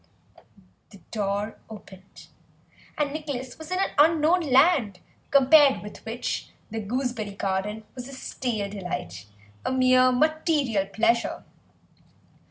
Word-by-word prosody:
The 200 Hz, -, -15 dB
door 205 Hz, 0 st, -2 dB
opened, 195 Hz, -3 st, -13 dB, 0.7 s
and 290 Hz, -1 st, -1 dB
Nicholas 285 Hz, -5 st, -6 dB
was 315 Hz, -, -9 dB
in 365 Hz, -, -1 dB
an 390 Hz, -, 0 dB
unknown 320 Hz, +3 st, +4 dB
land, 270 Hz, -, +3 dB, 0.3 s
compared 280 Hz, -1 st, +5 dB
with 210 Hz, -, -10 dB
which 235 Hz, +2 st, -4 dB, 0.2 s
the 225 Hz, -, -3 dB
gooseberry 220 Hz, -2 st, -3 dB
garden 200 Hz, +3 st, -2 dB
was 250 Hz, -1 st, -8 dB
a 275 Hz, -, -10 dB
stale 240 Hz, -5 st, -3 dB
delight, 105 Hz, -, -6 dB, 0.4 s
a -, -, -1 dB
mere 255 Hz, 0 st, +4 dB
material 290 Hz, -, +1 dB
pleasure. 230 Hz, +3 st, 0 dB
250 Hz, 115 wpm, -25 LUFS, 210-290 Hz, 0.7 s, compared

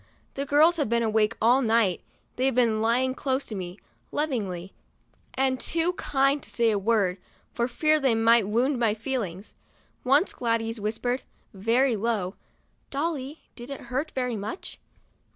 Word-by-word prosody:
The 275 Hz, +1 st, -4 dB
girls 310 Hz, +5 st, +5 dB
have 290 Hz, -8 st, 0 dB
been 235 Hz, 0 st, +2 dB
awake 215 Hz, -1 st, +1 dB
all 245 Hz, +4 st, +4 dB
night; 225 Hz, -6 st, +2 dB, 0.3 s
they've 260 Hz, 0 st, +1 dB
been 230 Hz, -3 st, +2 dB
lying 250 Hz, +3 st, +2 dB
close 265 Hz, 0 st, -1 dB
to -, -, -7 dB
me, 185 Hz, -2 st, -6 dB, 0.3 s
lovingly, 200 Hz, -, -2 dB, 0.6 s
and 260 Hz, -1 st, +1 dB
too 335 Hz, +2 st, 0 dB
kind 275 Hz, -3 st, +1 dB
to -, -, -10 dB
say 230 Hz, -1 st, +2 dB
a 205 Hz, -, 0 dB
word, 200 Hz, -3 st, +1 dB, 0.3 s
for 235 Hz, 0 st, 0 dB
fear 305 Hz, +5 st, +2 dB
they 265 Hz, -5 st, +2 dB
might 225 Hz, -1 st, +4 dB
wound 245 Hz, +5 st, +1 dB
my 220 Hz, -3 st, +2 dB
feelings. 220 Hz, -5 st, -4 dB, 0.5 s
Once 280 Hz, +8 st, +3 dB
Gladys 230 Hz, -1 st, -1 dB
whispered, 230 Hz, +5 st, -2 dB, 0.3 s
very 230 Hz, +6 st, +2 dB
low: 205 Hz, -4 st, -1 dB, 0.3 s
" -, -, -42 dB
Dolly, 290 Hz, 0 st, -3 dB
did 240 Hz, +1 st, -10 dB
it 275 Hz, -, -6 dB
hurt 275 Hz, +5 st, -1 dB
very 250 Hz, -2 st, -1 dB
much?" 215 Hz, -, -6 dB
235 Hz, 155 wpm, -26 LUFS, 220-270 Hz, 0.6 s, girls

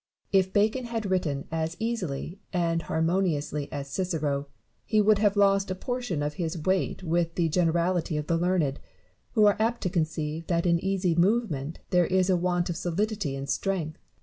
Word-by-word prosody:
Barrow. 195 Hz, -, +6 dB
If 190 Hz, 0 st, -1 dB
Bacon 220 Hz, +5 st, +2 dB
had 225 Hz, -4 st, -3 dB
written 150 Hz, -7 st, -1 dB
as 165 Hz, +1 st, -2 dB
easily 190 Hz, -7 st, -3 dB
and 170 Hz, -2 st, +1 dB
harmon 165 Hz, +3 st, +1 dB
iously 150 Hz, -4 st, -2 dB
as 140 Hz, -1 st, -4 dB
Cicero, 150 Hz, -6 st, -1 dB, 0.4 s
hs 215 Hz, -1 st, +5 dB
would 210 Hz, 0 st, +4 dB
have 205 Hz, -1 st, +2 dB
lost 195 Hz, -1 st, +4 dB
a 185 Hz, -, -1 dB
portion 245 Hz, -, -3 dB
of 150 Hz, 0 st, -2 dB
his 165 Hz, +1 st, -2 dB
weight 185 Hz, +3 st, 0 dB
with 165 Hz, 0 st, 0 dB
the 170 Hz, -2 st, +1 dB
generality 170 Hz, 0 st, +1 dB
of 150 Hz, -, -2 dB
the 170 Hz, -, +1 dB
learned, 165 Hz, -5 st, +1 dB, 0.5 s
who 215 Hz, -3 st, +5 dB
are 205 Hz, -, +4 dB
apt 230 Hz, +2 st, +1 dB
to 180 Hz, -, -1 dB
conceive 160 Hz, -2 st, -2 dB
that 170 Hz, -1 st, +1 dB
in 170 Hz, -1 st, +2 dB
easy 190 Hz, -2 st, +1 dB
movement 170 Hz, -, +1 dB
there 180 Hz, -1 st, +4 dB
is 185 Hz, 0 st, +2 dB
a -, -, +4 dB
want 175 Hz, 0 st, 0 dB
of 175 Hz, -, -3 dB
solidity 185 Hz, -3 st, -1 dB
and 135 Hz, 0 st, -5 dB
strength. 155 Hz, +2 st, -2 dB
175 Hz, 185 wpm, -27 LUFS, 160-195 Hz, 0.5 s, Barrow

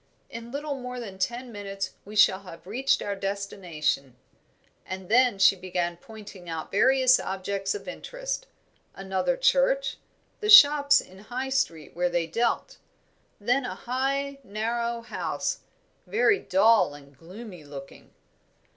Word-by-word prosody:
In 230 Hz, 0 st, -8 dB
little 290 Hz, +2 st, -3 dB
more 250 Hz, -2 st, -6 dB
than 195 Hz, -5 st, -8 dB
ten 240 Hz, +6 st, -2 dB
minutes 195 Hz, -2 st, -5 dB
we 210 Hz, +2 st, -10 dB
shall 195 Hz, -2 st, +5 dB
have 180 Hz, -4 st, -12 dB
reached 250 Hz, +8 st, 0 dB
our 200 Hz, -, -3 dB
destination;" 185 Hz, -9 st, -3 dB, 0.7 s
and 190 Hz, -1 st, -7 dB
then 245 Hz, -1 st, +4 dB
she 195 Hz, 0 st, +6 dB
began 180 Hz, -2 st, -3 dB
pointing 200 Hz, -2 st, -12 dB
out 160 Hz, -1 st, -5 dB
various 255 Hz, +4 st, +4 dB
objects 195 Hz, +1 st, -3 dB
of 195 Hz, -2 st, -8 dB
interest -, -, -5 dB, 0.5 s
another 195 Hz, -, -1 dB
church, -, -, +2 dB, 0.4 s
the 425 Hz, -, -2 dB
shops 285 Hz, -7 st, +8 dB
in 190 Hz, +1 st, -15 dB
High 250 Hz, +5 st, -5 dB
Street 165 Hz, -, -2 dB
where 180 Hz, +1 st, +1 dB
they 175 Hz, -1 st, 0 dB
dealt, 235 Hz, -, -1 dB, 0.6 s
then 245 Hz, +6 st, +1 dB
a -, -, -4 dB
high, 275 Hz, +2 st, -2 dB
narrow 235 Hz, +3 st, -2 dB
house, 230 Hz, -, -3 dB, 0.5 s
very 425 Hz, -2 st, +3 dB
dull 195 Hz, -5 st, +3 dB
and 140 Hz, -1 st, -16 dB
gloomy 180 Hz, -, -11 dB
looking. 140 Hz, -1 st, -11 dB
210 Hz, 135 wpm, -26 LUFS, 185-260 Hz, 0.7 s, shops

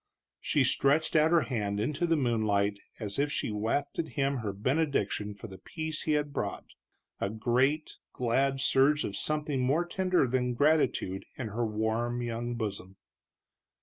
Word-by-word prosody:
She 145 Hz, -, +2 dB
stretched 140 Hz, +5 st, +2 dB
out 155 Hz, 0 st, +5 dB
her 170 Hz, -1 st, +5 dB
hand 105 Hz, -7 st, -2 dB
into 150 Hz, +9 st, 0 dB
the 165 Hz, -, +3 dB
moonlight 105 Hz, -6 st, +1 dB, 0.2 s
as 105 Hz, 0 st, -3 dB
if 145 Hz, +1 st, +1 dB
she -, -, -2 dB
wafted 140 Hz, +9 st, -1 dB
him 140 Hz, 0 st, +1 dB
her 110 Hz, -4 st, -3 dB
benediction 105 Hz, -3 st, 0 dB
for 100 Hz, -, -10 dB
the 95 Hz, -4 st, -9 dB
peace 160 Hz, -, -4 dB
he 155 Hz, -, 0 dB
had 150 Hz, -1 st, 0 dB
brought, -, -, -3 dB, 0.5 s
a 100 Hz, -, -1 dB
great, 125 Hz, +8 st, 0 dB
glad 135 Hz, +3 st, +1 dB
surge 140 Hz, +2 st, +3 dB
of 100 Hz, -, -4 dB
something 150 Hz, +1 st, -1 dB
more 145 Hz, +7 st, +2 dB
tender 185 Hz, -2 st, +1 dB
than 125 Hz, -1 st, 0 dB
gratitude 140 Hz, -9 st, +2 dB
in 120 Hz, -4 st, -4 dB
her 115 Hz, +2 st, -1 dB
warm 110 Hz, +3 st, -1 dB
young 120 Hz, +1 st, -3 dB
bosom. 100 Hz, -4 st, -5 dB
125 Hz, 155 wpm, -30 LUFS, 110-150 Hz, 0.5 s, out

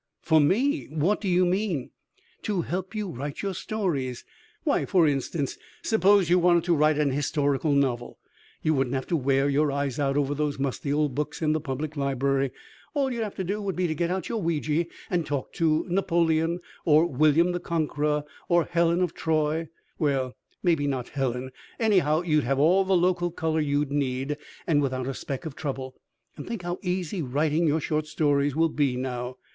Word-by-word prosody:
"For 160 Hz, -1 st, +4 dB
me! 260 Hz, -, +2 dB
What 160 Hz, +7 st, 0 dB
do 205 Hz, -, -3 dB
you 180 Hz, 0 st, +3 dB
mean?" 180 Hz, -, -1 dB, 0.5 s
"To 195 Hz, -5 st, -1 dB
help 185 Hz, +5 st, -4 dB
you 210 Hz, -1 st, -2 dB
write 140 Hz, +3 st, -5 dB
your 195 Hz, -1 st, -1 dB
stories. 165 Hz, -, -2 dB, 0.4 s
Why, -, -, +2 dB
for 180 Hz, -3 st, +3 dB
instance, 140 Hz, +1 st, -2 dB, 0.2 s
suppose 200 Hz, -4 st, +4 dB
you 180 Hz, +2 st, +4 dB
wanted 175 Hz, -1 st, +4 dB
to 175 Hz, -1 st, +2 dB
write 150 Hz, 0 st, +3 dB
an 150 Hz, -2 st, +2 dB
historical 145 Hz, +1 st, 0 dB
novel. 125 Hz, -4 st, 0 dB, 0.5 s
You 155 Hz, -, +3 dB
wouldn't 135 Hz, -2 st, 0 dB
have 130 Hz, -, -2 dB
to 175 Hz, -, +2 dB
wear 135 Hz, -1 st, +2 dB
your 145 Hz, +1 st, +2 dB
eyes 140 Hz, -1 st, -2 dB
out 140 Hz, -1 st, +1 dB
over 145 Hz, -1 st, +1 dB
those 150 Hz, 0 st, -1 dB
musty 140 Hz, +1 st, -2 dB
old 150 Hz, -2 st, +1 dB
books 150 Hz, +2 st, -3 dB
in 155 Hz, -1 st, +3 dB
the 155 Hz, -, -1 dB
public 150 Hz, +2 st, -4 dB
library. 135 Hz, -1 st, 0 dB, 0.5 s
All 270 Hz, -3 st, +1 dB
you'd 235 Hz, -, -3 dB
have 210 Hz, -2 st, -3 dB
to 190 Hz, -, -3 dB
do 200 Hz, +4 st, -2 dB
would 195 Hz, -2 st, -2 dB
be 185 Hz, -, 0 dB
to 160 Hz, -, 0 dB
get 170 Hz, +2 st, -1 dB
out 185 Hz, +1 st, -2 dB
your 225 Hz, -2 st, -2 dB
Ouija 165 Hz, -1 st, 0 dB, 0.2 s
and 175 Hz, -2 st, +1 dB
talk 145 Hz, -3 st, -4 dB
to 160 Hz, -2 st, +1 dB
Napoleon, 170 Hz, -2 st, +1 dB, 0.2 s
or 155 Hz, +1 st, +5 dB
William 155 Hz, +3 st, +3 dB
the 175 Hz, -, -2 dB
Conqueror, 150 Hz, -3 st, -1 dB, 0.3 s
or 175 Hz, -1 st, +4 dB
Helen 170 Hz, +1 st, +1 dB
of 175 Hz, -, -1 dB
Troy 160 Hz, 0 st, 0 dB, 0.3 s
well, 135 Hz, -4 st, 0 dB, 0.3 s
maybe 160 Hz, -5 st, +2 dB
not 130 Hz, -3 st, -2 dB
Helen 130 Hz, -2 st, -2 dB, 0.3 s
anyhow 180 Hz, -8 st, +3 dB
you'd 155 Hz, -4 st, +2 dB
have 135 Hz, +3 st, 0 dB
all 175 Hz, +7 st, +4 dB
the 190 Hz, -1 st, +3 dB
local 175 Hz, 0 st, +2 dB
color 160 Hz, -1 st, -1 dB
you'd 145 Hz, -1 st, 0 dB
need, 140 Hz, 0 st, -1 dB, 0.3 s
and 150 Hz, -3 st, +3 dB
without 130 Hz, -2 st, -1 dB
a 135 Hz, -, -2 dB
speck 135 Hz, +2 st, -5 dB
of 155 Hz, -4 st, -6 dB
trouble. 130 Hz, -3 st, -4 dB, 0.4 s
And -, -, -8 dB
think 230 Hz, -6 st, -4 dB
how 175 Hz, +1 st, -3 dB
easy 180 Hz, -1 st, -2 dB
writing 150 Hz, +4 st, +1 dB
your 155 Hz, +2 st, +2 dB
short 155 Hz, 0 st, -1 dB
stories 145 Hz, -2 st, +1 dB
will 165 Hz, +1 st, +3 dB
be 145 Hz, -5 st, +1 dB
now." 125 Hz, 0 st, -4 dB
155 Hz, 190 wpm, -26 LUFS, 140-175 Hz, 0.5 s, or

